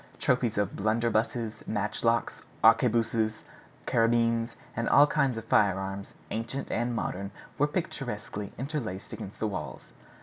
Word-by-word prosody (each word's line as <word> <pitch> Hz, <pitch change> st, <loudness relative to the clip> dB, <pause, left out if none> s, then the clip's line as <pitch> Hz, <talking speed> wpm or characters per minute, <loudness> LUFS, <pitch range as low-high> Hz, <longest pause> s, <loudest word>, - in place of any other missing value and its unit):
Trophies 125 Hz, -4 st, +1 dB
of 100 Hz, -1 st, 0 dB
blunderbuses, 110 Hz, +1 st, 0 dB
matchlocks, 110 Hz, +2 st, 0 dB, 0.2 s
arquebuses, 115 Hz, -1 st, +3 dB, 0.4 s
carbines, 115 Hz, 0 st, +2 dB, 0.3 s
all 145 Hz, -, +8 dB
kinds 140 Hz, -5 st, +1 dB
of 115 Hz, -, -6 dB
firearms, 100 Hz, -2 st, +1 dB, 0.2 s
ancient 115 Hz, +5 st, -3 dB
and 120 Hz, +1 st, 0 dB
modern, 100 Hz, -3 st, -3 dB, 0.3 s
were 145 Hz, -, +4 dB
picturesquely 120 Hz, -, -4 dB
interlaced 130 Hz, -8 st, -4 dB
against 100 Hz, -, -8 dB
the -, -, 0 dB
walls. 90 Hz, -8 st, -6 dB
115 Hz, 110 wpm, -29 LUFS, 105-120 Hz, 0.4 s, all